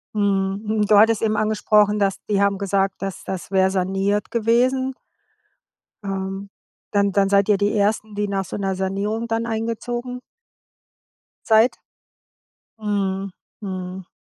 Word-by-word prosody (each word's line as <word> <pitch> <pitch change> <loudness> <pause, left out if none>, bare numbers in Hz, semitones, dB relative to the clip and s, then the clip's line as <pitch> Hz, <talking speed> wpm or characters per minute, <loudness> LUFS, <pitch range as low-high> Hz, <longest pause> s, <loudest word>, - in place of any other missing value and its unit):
Mhm, 195 -1 0
hm. 210 0 +1
Du 210 - +5
hattest 220 +1 +5
eben 215 -1 +1
angesprochen, 210 -1 +2
dass 195 -1 0
die 200 -1 +2
haben 200 -1 +2
gesagt, 195 0 0
das 195 -1 -5
das 190 0 -5
wäre 190 -1 +3
saniert 195 +2 -1
gewesen. 255 +3 +1 1.1
Ähm, 195 0 -4 0.4
dann 200 -1 +2
dann 195 0 +2
seid 200 +1 +3
ihr 205 - +5
die 205 +1 +1
Ersten, 210 +1 0
die 205 0 -1
nach 195 -1 -2
so 190 - -6
'ner 195 -1 -1
Sanierung 200 +4 -2
dann 225 0 -1
eingezogen 235 +2 -3 1.3
seid? 225 +2 +4 1.0
Mhm, 195 -2 -1 0.3
mhm. 185 -2 -6
205 Hz, 135 wpm, -22 LUFS, 195-220 Hz, 1.3 s, Du